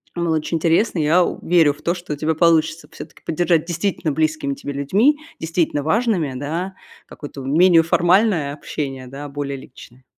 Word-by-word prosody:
Было 170 -2 0
очень 160 +2 -2
интересно, 170 +6 +1
я 165 +3 +3
у - - -3
верю 165 -4 +4
в 150 - -20
то, 170 - +1
что 175 -4 -6
у - - -3
тебя 155 +2 -1
получится 160 0 +2
всё-таки - - -11
поддержать 165 0 +1
действительно 170 -2 -2
близкими 155 -2 -1
тебе 145 - -6
людьми, 195 - +2 0.2
действительно 160 -3 -1
важными, 180 - 0
да, 165 +8 -4 0.3
какое-то 145 -2 -10
менее 165 +5 +5
формальное 175 -2 +2
общение, 135 -3 -5
да, 140 +3 -8
более 140 -1 -4
личное. 130 -1 -15
160 Hz, 165 wpm, -20 LUFS, 145-175 Hz, 0.3 s, менее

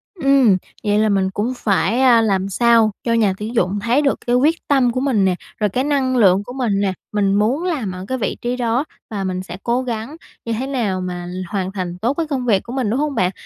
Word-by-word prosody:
Ừm, 275 - +4 0.3
vậy 210 0 +2
là 215 0 +2
mình 195 -1 +1
cũng 220 +6 -2
phải, 200 0 +1
a, 240 -3 +6
làm 195 -3 0
sao 230 +1 +4
cho 230 - 0
nhà 215 -4 +2
tuyển 220 +3 -5
dụng 200 -1 +1
thấy 235 +7 +2
được 280 -2 +1
cái 245 - +3
quyết 310 +6 +1
tâm 265 -4 +3
của 255 - -2
mình 255 -8 +2
nè, 185 -1 +2 0.2
rồi 210 -1 +1
cái 255 +7 -1
năng 270 -3 +1
lượng 195 -3 +4
của 245 - -9
mình 235 -7 0
nè, 190 -2 0 0.2
mình 200 -2 +1
muốn 235 +10 +1
làm 295 - -2
ở 185 +1 -7
cái 260 - -2
vị 220 - -2
trí 240 +1 -1
đó, 245 +2 0 0.3
và 200 -3 -3
mình 185 0 -3
sẽ - - -8
cố 240 +2 +1
gắng 240 +3 -5 0.3
như 230 - -2
thế 250 +4 -3
nào 220 -9 -1
mà 180 -1 -5
l 180 - -7
hoàn 190 -2 -2
thành 180 -3 -4
tốt 235 +7 0
cái 325 +2 -2
công 265 -4 -2
việc 200 -5 +2
của 240 - -8
mình, 255 -5 -1
đúng 245 +6 0
hông 295 -2 -1
bạn? 180 0 +1
225 Hz, 255 wpm, -19 LUFS, 195-255 Hz, 0.3 s, a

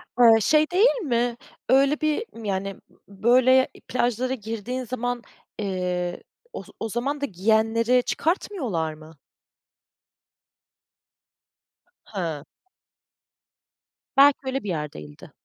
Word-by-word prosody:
A, 230 -2 +7
şey 305 - +3
değil 430 +7 +4
mi? 240 -4 0 0.3
Öyle 275 +4 +4
bir, 310 +8 0 0.2
yani, 195 0 -2 0.3
b 200 +1 -17
böyle 255 +2 +5 0.2
plajlara 255 +1 0
girdiğin 230 +2 -5
zaman, 245 0 -3 0.4
eee, 180 -3 -2 0.3
oz - - -7
o 225 - -3
zaman 275 +6 -2
da - - +1
giyenleri 225 +4 +2
çıkartmıyorlar 255 - -1
mı? 155 0 -15 2.9
Hıı. 165 -8 -4 1.7
Belki, 280 +1 +7
öyle 265 +1 -2
bir 205 - -5
yer 150 -4 -3
değildi. 75 -1 -12
235 Hz, 100 wpm, -24 LUFS, 195-260 Hz, 2.9 s, A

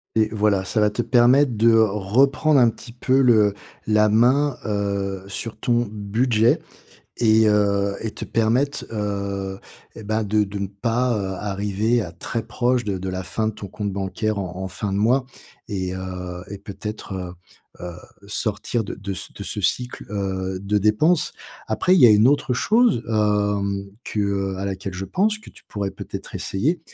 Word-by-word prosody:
Et 110 -1 +4
voilà, 100 -3 +2
ça 105 +4 0
va 105 - +4
te 105 - -2
permettre 125 +3 +4
de 115 +2 +4
reprendre 115 +8 +3
un 120 -2 +6
petit 115 +1 -9
peu 130 +3 +2
le 110 -5 +5 0.3
la 105 0 +4
main, 125 +5 +3
heu, 100 -2 -2
sur 110 +3 -5
ton 120 -2 +1
budget 110 +3 +2 0.6
et 110 -1 +4
heu 100 -1 +2
et 110 - -3
te - - -7
permettre, 125 +6 0
heu 100 -2 -3 0.4
et - - -9
bah, 110 +1 -1
de 105 +1 +2
de 100 0 -6
ne 100 - -1
pas 115 +5 -1 0.3
arriver 105 +4 0
à 90 -6 -4
très 110 +7 -4
proche 120 +2 0
de 100 -2 -2
de 95 +1 -5
la 95 0 -3
fin 110 +4 -2
de - - -2
ton 100 - -8
compte 100 0 -4
bancaire 100 +2 -2
en 90 -2 -4
en 95 - -4
fin 95 +2 -3
de - - 0
mois 125 +5 +2 0.4
et 95 -2 -3
heu 90 -1 -6
et 100 - -6
peut-être, 100 +1 -7
heu 90 -1 -5 0.5
heu, 90 -1 -6 0.3
sortir 110 +2 -1
de - - -6
de 100 0 -5
c 95 - -6
de 100 - -6
ce 105 - -4
cycle, 125 +6 -1
heu, 95 -2 -2
de 100 +2 0
dépenses. 110 - +2 0.3
Après, 185 - +2
il 185 - +4
y 125 - +10
a - - +7
une 105 +3 +6
autre 135 -3 +2
chose, 220 - +3
hem, 105 -2 0
que, 105 - -2
heu, 100 -1 -1
à 95 - -4
laquelle 95 -1 -4
je 95 +2 -4
pense, 210 - +1
que 215 - -14
tu - - -19
pourrais 100 -2 -3
peut-être - - -8
essayer, 150 - -1
105 Hz, 185 wpm, -22 LUFS, 100-115 Hz, 0.6 s, y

